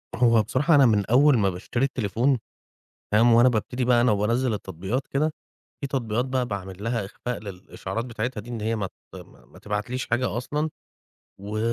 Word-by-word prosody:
هو 115 -3 +4
بصراحة 150 - +2
أنا 140 -2 +7
من 105 -4 +3
أول 135 +3 +5
ما 100 -2 +2
باشتري 100 +8 -1
التليفون 125 0 0 0.7
فاهم، 115 +3 +5
وأنا 120 +2 +6
بابتدي 125 +2 -1
بقى 120 -1 +4
أنا 120 -2 +4
وبانزّل 115 +4 +1
التطبيقات 100 - -4
كده، 155 +3 0 0.5
في 140 - -2
تطبيقات 125 -3 -1
بقى 130 -1 -1
باعمل 95 -1 -6
لها 115 -2 -1
إخفاء 120 +5 -5
للإشعارات 100 +2 -6
بتاعتها 120 -1 -4
دي 115 - -11
إن 115 -2 -4
هي 110 +2 -1
ما 100 -3 -2
ت - - -16
ما - - -14
ما - - -18
تبعتليش 105 +5 -3
حاجة 120 0 0
أصلًا 150 +5 -2 0.7
و 105 +2 -4
115 Hz, 180 wpm, -25 LUFS, 105-130 Hz, 0.7 s, أنا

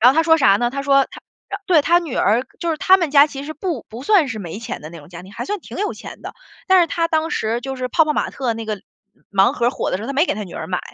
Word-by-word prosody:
然 250 +4 +7
后 - - -5
他 325 - +5
说 325 0 +4
啥 200 -10 +5
呢， 240 +2 0
他 275 +2 -4
说 275 -1 +4
他 - - -11 0.3
他 - - -4
对， 335 -6 +4
他 345 +4 +4
女 330 -7 -5
儿， 230 +5 +2 0.2
就 340 - -1
是 320 - -1
他 375 +5 +5
们 340 -5 -1
家 285 0 +7
其 275 -2 -8
实 310 - -6
不 315 - -4
不 230 +3 -9
算 360 -3 +3
是 225 -3 -5
没 185 -1 -6
钱 230 - -6
的 155 - -9
那 170 - -10
种 145 - -15
家 175 0 -10
庭， 190 +2 -14
还 - - -5
算 415 +1 -3
挺 - - -10
有 415 +1 -1
钱 - - -11
的。 - - -7 0.3
但 375 -1 +6
是 340 - +3
他 335 0 -1
当 320 0 0
时 225 +2 -1
就 265 +1 -5
是 255 0 -3
泡 320 +6 +3
泡 300 - 0
玛 - - -1
特 250 -4 -2
那 225 0 -6
个 210 -3 -4 0.5
盲 195 0 +4
盒 235 - -1
儿 - - +3
火 - - -3
的 - - 0
时 195 - -8
候， 225 - -5
他 275 - -3
没 300 +6 +2
给 - - 0
他 210 +1 -5
女 180 - -11
儿 - - -5
买。 180 -1 -2
275 Hz, 355 characters per minute, -20 LUFS, 220-325 Hz, 0.5 s, 然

